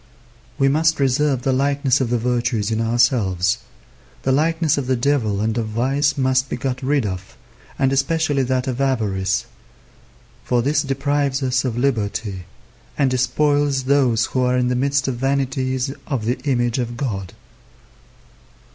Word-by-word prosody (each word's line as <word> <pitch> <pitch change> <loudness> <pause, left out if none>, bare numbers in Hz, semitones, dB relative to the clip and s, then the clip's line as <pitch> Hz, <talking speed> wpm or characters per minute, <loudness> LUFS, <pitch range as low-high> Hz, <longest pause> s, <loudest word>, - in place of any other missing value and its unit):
We 135 - +3
must 155 +3 +2
reserve 135 -1 +1
the 135 - +1
likeness 140 0 +1
of 125 - 0
the 120 - +1
virtues 120 -2 -1
in 110 0 0
ourselves. 115 -6 +2 0.6
The 135 - +1
likeness 160 +2 +2
of 140 -3 -3
the 130 - +2
devil 120 -6 0
and 110 0 0
of 110 - -2
vice 135 +6 0
must 130 0 +1
be - - -2
got 130 +1 -3
rid 135 -2 +1
of, 95 -2 -6 0.4
and 135 0 +2
especially 145 +1 +1
that 130 0 -1
of 130 0 -2
avarice; 105 -5 0 1.0
for 120 -1 +1
this 145 +3 +2
deprives 140 0 -1
us 130 0 +1
of 120 -3 -2
liberty, 105 -7 -1 0.5
and 135 -3 +2
despoils 145 +1 +1
those 130 -4 +2
who 130 - -2
are 125 0 +2
in 125 0 +1
the 125 - 0
midst 140 +2 +1
of 130 -3 -2
vanities 130 0 -1
of 130 -7 -2
the 120 +2 -1
image 120 -1 +1
of 120 -1 -3
God. 100 -9 -4
130 Hz, 155 wpm, -20 LUFS, 120-140 Hz, 1.0 s, We